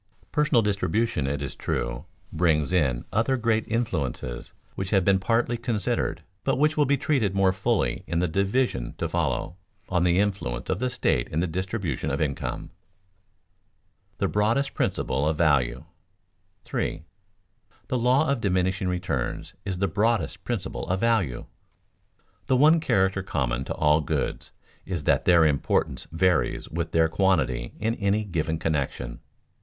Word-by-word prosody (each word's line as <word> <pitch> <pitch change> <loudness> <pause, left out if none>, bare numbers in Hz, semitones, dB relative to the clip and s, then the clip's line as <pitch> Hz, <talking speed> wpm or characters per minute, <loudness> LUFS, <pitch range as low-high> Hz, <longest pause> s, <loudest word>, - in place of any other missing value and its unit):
Personal 145 -6 +3
distribution, 105 -5 0
it 70 +1 -2
is 70 - -5
true, - - -3 0.3
brings 80 -1 +2
in 65 -9 +1
other 115 +5 +2
great 110 -2 +1
influences 70 - -3 0.2
which 95 -1 -4
have 95 -3 +2
been 95 -1 +4
partly 115 +4 +1
considered, 115 -4 -1 0.2
but - - +1
which 150 +3 +2
will 150 -2 +3
be 140 +1 +3
treated 130 -9 0
more 95 -1 +3
fully 95 - 0
in 85 - -1
the 90 +1 +2
division 100 - 0
to 85 - -1
follow, 80 0 -1 0.3
on 90 -2 +1
the 90 0 +3
influence 90 -12 -1
of 95 - -1
the 125 +1 0
state 120 - 0
in 75 - -2
the 90 - +1
distribution 95 - -3
of - - -1
income. - - -2
[Sidenote: - - -13 1.5
The - - +1
broadest 115 +7 +1
principle 70 +3 0
of 80 - -1
value] 65 -7 +2 0.8
3. 85 - -3 0.8
The 125 - 0
law 130 +6 +3
of 140 -5 0
diminishing 95 -1 0
returns 90 -9 -2
is 95 -3 -2
the 100 +2 +1
broadest 105 +1 0
principle 100 -6 -3
of 90 +1 0
value. 110 - +1 1.0
The 130 - +3
one 155 +5 +6
character 95 -9 +1
common 65 -9 -2
to - - -4
all 75 0 +3
goods 70 - -3 0.3
is 90 -5 -4
that - - +2
their 85 -3 +6
importance 70 -3 0
varies 90 0 +1
with 85 0 -3
their 80 0 +4
quantity 80 -9 +1
in 110 +2 0
any 105 -1 0
given 80 -5 -2
connection. 70 -6 -2
95 Hz, 150 wpm, -26 LUFS, 80-110 Hz, 1.5 s, one